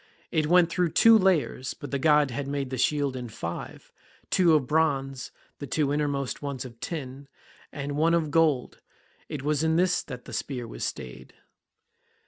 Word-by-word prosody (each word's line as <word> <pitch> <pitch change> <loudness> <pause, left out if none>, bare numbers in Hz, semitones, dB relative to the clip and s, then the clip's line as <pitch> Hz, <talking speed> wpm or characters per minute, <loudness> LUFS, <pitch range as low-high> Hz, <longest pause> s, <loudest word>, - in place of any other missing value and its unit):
It 155 -1 +1
went 175 0 +4
through 175 -2 0
two 230 0 +7
layers, 185 -10 +1
but 145 - -9
the 140 - -1
god 150 -2 +4
had 135 +3 -4
made 140 -2 -3
the 130 - -3
shield 145 -1 +1
in 125 -2 -6
five, 85 -6 -7 0.4
two 170 -4 +5
of 145 -4 +2
bronze, 135 -3 0 0.3
the 145 - -6
two 145 -1 0
innermost 145 -3 -2
ones 140 -3 -4
of 115 -2 -11
tin, 140 -3 -6 0.4
and 145 0 -5
one 165 +3 +3
of 160 -3 0
gold; 155 -5 +1 0.5
it 140 -3 -5
was 150 +1 0
in 160 0 +2
this 180 +1 +2
that 125 -3 -9
the 120 - -10
spear 120 +1 -4
was - - -7
stayed. 65 +1 -6
145 Hz, 175 wpm, -27 LUFS, 130-160 Hz, 0.5 s, two